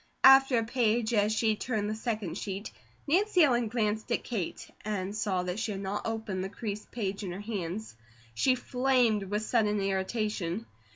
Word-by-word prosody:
After 270 -1 +8
a 230 - +2
page 235 -1 +1
as 210 -1 +3
she 220 0 +2
turned 215 -2 -2
the 215 - -1
second 215 -5 -3
sheet 200 +1 -5 0.3
Nancy 365 +3 +4
Ellen 240 -5 +3
glanced 215 0 -1
at - - +1
Kate, 210 -8 -4 0.2
and 200 -1 -3
saw 195 -4 0
that 180 +3 -3
she 225 -2 -2
had 195 - -5
not 200 +2 -3
opened 220 -4 -3
the 190 - -3
creased 210 0 -5
page 205 -3 -3
in 185 - -4
her 180 - -6
hands. 205 - -4 0.4
She 255 - +3
flamed 250 -4 +2
with 210 +2 -2
sudden 210 -3 +2
irritation. 195 0 -1
215 Hz, 175 wpm, -30 LUFS, 200-235 Hz, 0.4 s, After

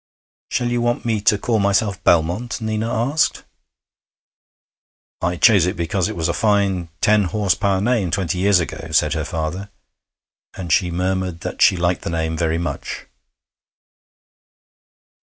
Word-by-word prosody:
'Shall 120 -1 -1
you 120 0 0
want 120 0 -1
me 110 -3 0
to 105 0 +3
call 110 +2 0
myself 100 -1 0
Belmont?' 85 +8 +1
Nina 110 0 -2
asked. 130 +7 0 1.8
'I 90 +1 0
chose 100 -5 +5
it 90 - -2
because 85 +1 -1
it - - -5
was 80 -1 -1
a 85 - 0
fine 100 -5 +1
ten 105 -1 +3
horse 100 +1 +1
power 100 -2 0
name 105 -3 +1
twenty 90 0 -1
years 100 -1 +4
ago,' 80 -1 -5
said 80 - +2
her - - -2
father; 80 +5 -4 0.9
and 90 -3 -2
she 90 - +2
murmured 90 0 -2
that - - -6
she 95 - +5
liked 85 +1 0
the - - -4
name 80 -1 -2
very 80 0 0
much. 85 +1 -5
95 Hz, 150 wpm, -20 LUFS, 85-105 Hz, 1.8 s, chose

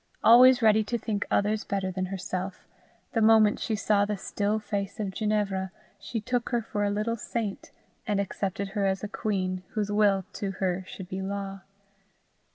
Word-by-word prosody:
Always 250 +1 +8
ready 215 0 +5
to 235 +3 -1
think 210 -2 -3
others 210 +1 +1
better 195 -1 -2
than 185 0 -2
herself, 185 0 -5 0.5
the 225 - +1
moment 220 -1 +5
she 220 - -1
saw 205 -1 +2
the 205 0 -1
still 205 +3 -1
face 205 -2 -4
of 200 -3 -2
Ginevra, 200 -2 -1 0.3
she 210 +4 -4
took 240 +2 -2
her 240 -2 0
for 205 -1 -2
a 205 - +2
little 215 +3 -1
saint, 215 -2 -4 0.4
and 205 -2 +1
accepted 200 0 -2
her 200 -1 0
as 190 +1 -1
a - - -1
queen, 185 -3 -2
whose 210 -3 -1
will 205 -3 +3
to 195 -1 -3
her 185 -1 -1
should 185 -1 -8
be 190 +1 -4
law. 195 0 -4
205 Hz, 175 wpm, -27 LUFS, 195-215 Hz, 0.5 s, Always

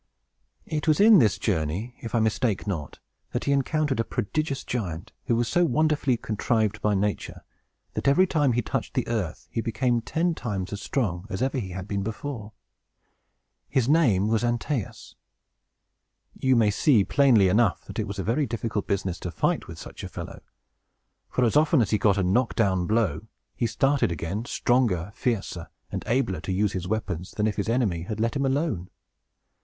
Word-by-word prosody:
It 155 0 -3
was 155 -1 +4
in 210 -1 +8
this 110 -7 +3
journey, 95 +5 -2
if 115 -1 -4
I - - +4
mistake 110 -1 0
not, 80 -9 -4 0.4
that - - -1
he - - 0
encountered 140 -1 +1
a - - +3
prodigious 135 +6 -2
giant, 90 -9 -4
who 120 - +2
was 120 0 +1
so 175 - +2
wonderfully 150 -4 +2
contrived 110 -1 0
by 105 -1 +2
nature, 100 +1 -2 0.5
that - - -2
every 175 +7 +5
time 145 -8 +2
he 120 0 0
touched - - -3
the - - 0
earth 105 -9 -3
he 115 - -1
became 120 +1 0
ten 165 +8 0
times 100 - -4
as 100 - -5
strong 100 -9 -2
as 100 +4 -2
ever 135 0 0
he 100 -6 -5
had 90 +1 -6
been 100 -1 -2
before. 110 +1 -5 1.2
His 130 -3 +1
name 125 - +4
was 110 0 +2
Antæus. 120 0 -2 1.2
You 130 -1 +2
may 110 -3 +4
see, 115 -1 +4
plainly 120 -6 +4
enough, 105 +1 +2
that - - -7
it 110 - -1
was 100 0 -6
a 95 - -2
very 130 +8 +1
difficult 110 -3 -3
business 95 -3 -1
to 90 - -4
fight 85 - -1
with - - -9
such - - -9
a - - -5
fellow; - - -8 0.9
for, 125 - 0
as 115 - +2
often 150 -2 +4
as 110 -6 +1
he 105 - +2
got 100 -2 +3
a 100 - +1
knock 110 +7 +1
down 95 -5 +1
blow, 110 -9 +1
up - - -10 0.3
he 120 - 0
started 135 0 +1
again, 85 +7 -3
stronger, 110 -9 +1
fiercer, 110 -9 -2 0.2
and - - -3
abler 115 -9 0
to 95 - -4
use 100 +2 +1
his 90 -1 -3
weapons, 95 -4 -3
than 105 - 0
if 105 -2 -1
his 100 +2 -1
enemy 115 -9 +1
had 105 +5 -5
let 115 +5 0
him 140 -1 +1
alone. 135 - -1
110 Hz, 190 wpm, -26 LUFS, 100-130 Hz, 1.2 s, in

